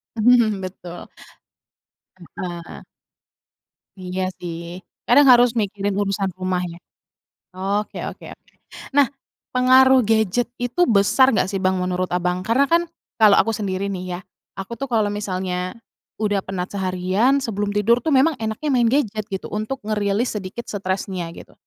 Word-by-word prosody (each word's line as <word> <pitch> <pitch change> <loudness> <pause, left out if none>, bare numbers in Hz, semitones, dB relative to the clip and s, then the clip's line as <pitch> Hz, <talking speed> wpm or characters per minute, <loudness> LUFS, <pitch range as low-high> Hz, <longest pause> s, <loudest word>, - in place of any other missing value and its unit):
Mhm, 220 -3 +3
betul. 180 -2 -8 1.3
Heeh. 175 -2 -6 1.2
Iya 185 0 -3
sih, 170 +1 -7 0.2
kadang 285 +4 +6
harus 245 -1 +5
mikirin 205 -1 -1
urusan 195 -1 0
rumah 185 -1 -1
ya? 170 0 -9 0.8
Oke 200 +3 -2
oke - - -12
oke. - - -24 0.4
Nah, 285 - +6 0.5
pengaruh 260 +1 +6
gadget 220 +1 +1
itu 245 +9 -2
besar 215 +5 +4
nggak 200 - +2
sih, 195 - -2
Bang, 185 0 +1
menurut 180 0 -1
Abang? 180 +1 -1
Karena 235 +8 +2
kan 335 +3 +3 0.4
kalau 210 -2 +7
aku 225 - +3
sendiri 200 -2 -2
nih 180 -1 -4
ya, - - -9 0.4
aku 195 +4 -6
tuh 275 - -3
kalau 220 -4 +2
misalnya 185 -3 -3 0.4
udah 205 -2 0
penat 185 -1 -5
seharian, 190 +7 +1
sebelum 205 -3 -2
tidur 230 +4 +3
tuh, 315 - -1
memang 295 +5 +4
enaknya 220 +7 -3
main 240 -3 +3
gadget 225 -5 0
gitu, 190 -3 -6
untuk 215 +5 -4
ngerilis 210 +2 0
sedikit 195 +5 -7
stresnya, 190 -3 -3
gitu. - - -13
205 Hz, 140 wpm, -21 LUFS, 185-235 Hz, 1.3 s, kalau